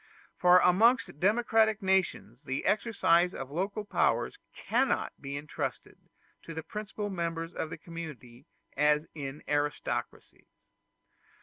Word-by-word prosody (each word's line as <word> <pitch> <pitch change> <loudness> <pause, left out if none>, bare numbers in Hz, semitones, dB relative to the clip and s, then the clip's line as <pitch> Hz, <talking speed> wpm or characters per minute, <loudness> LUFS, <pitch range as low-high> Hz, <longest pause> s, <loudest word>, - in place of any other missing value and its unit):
For 180 0 +6
amongst 190 - +4
democratic 220 +1 +3
nations 185 - 0
the 135 -2 -4
exercise 180 -5 +2
of 135 0 -6
local 195 +6 -2
powers - - +1
cannot - - 0
be 140 +1 -5
intrusted 145 +1 -6 0.3
to 165 - -9
the 160 - -4
principal 210 0 -5
members 165 -2 -3
of 160 - -3
the 165 - -6
community 155 -6 -9 0.3
as 150 +2 +3
in 140 -1 -7
aristocracies. 145 0 -3
165 Hz, 115 wpm, -30 LUFS, 150-200 Hz, 0.3 s, For